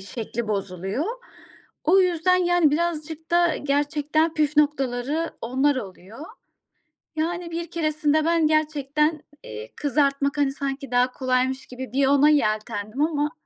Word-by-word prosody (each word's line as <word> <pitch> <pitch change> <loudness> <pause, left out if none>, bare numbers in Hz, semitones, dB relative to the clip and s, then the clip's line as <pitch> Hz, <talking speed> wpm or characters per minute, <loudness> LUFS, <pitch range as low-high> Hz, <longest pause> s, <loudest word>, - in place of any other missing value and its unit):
şekli 225 +2 -5
bozuluyor. 195 - -2 0.8
O 370 +5 +5
yüzden 365 0 +2
yani 350 -4 +3
birazcık 320 -1 -3
da 345 -1 +3
gerçekten 295 +3 0
püf 300 -1 0
noktaları 290 +1 +1
onlar 265 +4 +1
oluyor. 210 - -8 0.9
Yani 340 +2 -2
bir 335 0 -5
keresinde 310 -1 +1
ben 330 -1 +3
gerçekten, 300 0 0 0.2
eee, 110 0 -8
kızartmak 280 0 0
hani 285 -2 +2
sanki 275 -1 -5
daha 250 +1 +2
kolaymış 260 +1 -1
gibi 250 -1 -8
bir 270 0 +3
ona 285 +2 +5
yeltendim 215 -3 0
ama 300 -1 +1
290 Hz, 125 wpm, -24 LUFS, 255-315 Hz, 0.9 s, O